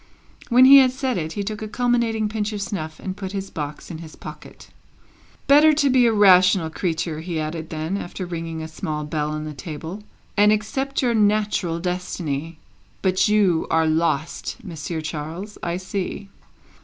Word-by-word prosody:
When 250 +1 +7
he 275 +1 +10
had 260 -1 +5
said 260 -4 -2
it, 160 0 -4
he 205 - -3
took 215 +1 -5
a 215 - -4
culminating 235 -2 +1
pinch 210 0 -3
of 205 - -4
snuff, 160 -6 -5
and 190 -1 -5
put 190 -1 -6
his 195 -1 -4
box 150 +1 -6
in 160 - -7
his 160 -2 -10
pocket. - - -11 0.7
"Better 300 +2 +6
to 285 -2 +2
be 250 -2 +5
a - - +3
rational 185 -4 +5
creature," 165 -2 -2
he 165 -1 -3
added 160 +1 -4
then, 160 +4 -3
after 185 0 -5
ringing 165 -2 -5
a - - -5
small 155 -1 -4
bell 150 0 -2
on 155 0 -4
the 155 - -6
table, 160 +6 -7 0.3
"and 210 +1 +5
accept 265 +7 -1
your 240 -2 +2
natural 210 -5 +1
destiny. 165 -3 -3 0.5
But 185 +1 +3
you 200 -6 +2
are 160 0 +3
lost, 160 -1 -1
Monsieur 165 -3 -5
Charles, 160 +6 -6
I 170 0 -2
see." 195 +1 -5
185 Hz, 175 wpm, -22 LUFS, 160-215 Hz, 0.7 s, he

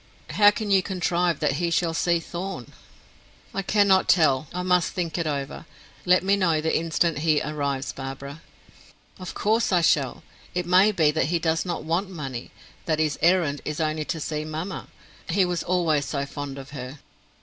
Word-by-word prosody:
How 205 -1 +6
can 205 0 -3
you 195 -1 +5
contrive 180 -3 0
that 135 - +1
he 170 - +1
shall 170 0 +1
see 170 +1 +1
Thorn?" 175 -6 -6 0.8
"I 195 - -1
cannot 195 -1 +3
tell; 155 -4 +4
I 180 +1 -3
must 180 -1 +2
think 170 -4 -3
it 170 -2 -1
over. 140 +2 -4 0.4
Let 180 +1 +5
me 195 +1 +3
know 170 -5 +2
the 160 +1 0
instant 165 -1 0
he 155 -1 +2
arrives, 140 -2 -3
Barbara." 135 +3 -7 0.8
"Of 185 -2 -7
course 220 +2 +1
I 180 -2 +4
shall. 140 -6 +1 0.3
It 180 -1 -1
may 185 +4 +5
be 160 -7 +3
that 160 - +1
he 170 +3 +1
does 165 0 0
not 175 - -3
want 175 +5 -1
money; 135 -9 -6 0.4
that 160 -2 +1
his 155 -2 0
errand 170 -5 +2
is 150 +1 -4
only 155 -1 -1
to 165 - -3
see 150 0 -3
mamma. 160 +5 -5 0.4
He 185 +2 +3
was 175 -1 -2
always 165 -5 +1
so 140 -1 -2
fond 140 -1 -6
of 135 +1 -9
her." 130 0 -7
165 Hz, 180 wpm, -25 LUFS, 150-180 Hz, 0.8 s, How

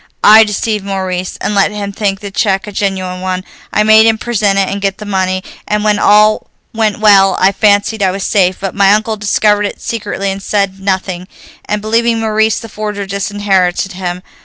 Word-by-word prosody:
I 220 +1 +8
deceived 210 0 -2
Maurice, 185 -2 -4
and - - -2
let 200 -1 +3
him 205 -1 -5
think 195 -1 -2
the 200 -1 -7
check 195 -1 0
a 210 - -8
genuine 190 -2 -3
one; 185 0 -3 0.3
I 210 - +2
made 220 +1 +6
him 225 -1 +2
present 210 -4 0
it 195 -1 +2
and 200 0 -4
get 195 -1 -1
the 210 - -9
money, 185 -2 -1 0.2
and 210 0 -1
when 210 -1 +1
all 215 +1 +3 0.3
went 220 -2 0
well 195 -3 +4
I 190 +1 +4
fancied 205 +1 +1
I 190 - +3
was 190 +1 -4
safe. 185 -3 +1
But 195 -1 -4
my 200 -1 +3
uncle 220 +1 -2
discovered 210 0 +1
it - - -9
secretly, 205 -3 -3
said 195 -1 -2
nothing, 190 -2 -3 0.4
and, 210 0 -3
believing 230 +1 +1
Maurice 220 0 +1
the 230 - -9
forger, 210 -2 -5
disinherited 195 -2 -1
him. 180 -1 -5
200 Hz, 190 wpm, -13 LUFS, 190-215 Hz, 0.4 s, I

